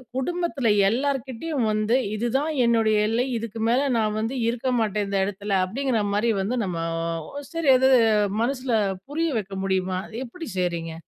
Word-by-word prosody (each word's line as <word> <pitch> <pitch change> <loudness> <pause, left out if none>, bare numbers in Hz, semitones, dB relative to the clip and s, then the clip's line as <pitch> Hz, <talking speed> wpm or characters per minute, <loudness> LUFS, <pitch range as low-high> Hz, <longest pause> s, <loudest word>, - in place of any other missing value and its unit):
குடும்பத்தில 300 -2 -1 0.2
எல்லார்க்கிட்டயும் 265 +2 -1
வந்து, 215 +2 +1 0.2
இதுதான் 255 +8 0
என்னுடைய 225 -2 +3
எல்லை. 230 +3 +1
இதுக்கு 225 0 -6
மேல 265 +4 +2
நான் 215 -1 0
வந்து 225 +4 -2
இருக்க 245 +2 -1
மாட்டேன் 210 -2 0
இந்த 200 0 -1
இடத்தில. 205 +1 -5
அப்பிடிங்கிறமாரி 220 -1 0
வந்து 225 +6 -1
நம்ம 180 -3 -3 0.5
ஒ, - - -16 0.2
சரி, 330 -3 0
அது 265 +1 +4 0.5
மனசுல 255 0 -2 0.4
புரிய 325 +3 0
வைக்க 195 -1 -7
முடியுமா? 190 -1 0
அது 225 - -12
எப்பிடி 325 +7 -9
செய்றீங்க? 170 -2 -2
230 Hz, 145 wpm, -24 LUFS, 205-265 Hz, 0.5 s, அது